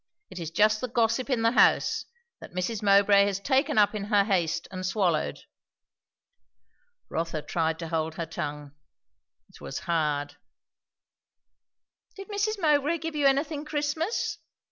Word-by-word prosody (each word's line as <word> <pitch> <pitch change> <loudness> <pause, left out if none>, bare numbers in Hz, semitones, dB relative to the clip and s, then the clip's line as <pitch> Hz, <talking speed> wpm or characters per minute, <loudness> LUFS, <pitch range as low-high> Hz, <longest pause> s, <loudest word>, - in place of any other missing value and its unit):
It 185 - -8
is 165 -2 -4
just 215 +5 +2
the 255 - -2
gossip 235 +2 0
in 245 -4 0
the 230 - +4
house, - - +3 0.3
that - - -12
Mrs. 200 +4 -2
Mowbray 200 0 +5
has 200 -1 -2
taken 265 +3 +1
up 210 0 +4
in 205 -2 -4
her 205 -1 +3
haste 170 -5 0
and 185 -1 -6
swallowed." 185 -4 0 1.7
Rotha 165 -2 -3
tried 160 -1 -1
to 165 -1 -6
hold 160 -1 -2
her 170 - -3
tongue. 150 -2 -6 0.8
It - - -18
was - - -6
hard. 150 -4 -1 1.8
"Did 390 0 -10
Mrs. 415 +1 -1
Mowbray 300 -1 +2
give 325 -1 -5
you 290 -2 +3
anything 285 +2 0
Christmas?" 305 +6 -2
205 Hz, 145 wpm, -27 LUFS, -, 1.8 s, Mowbray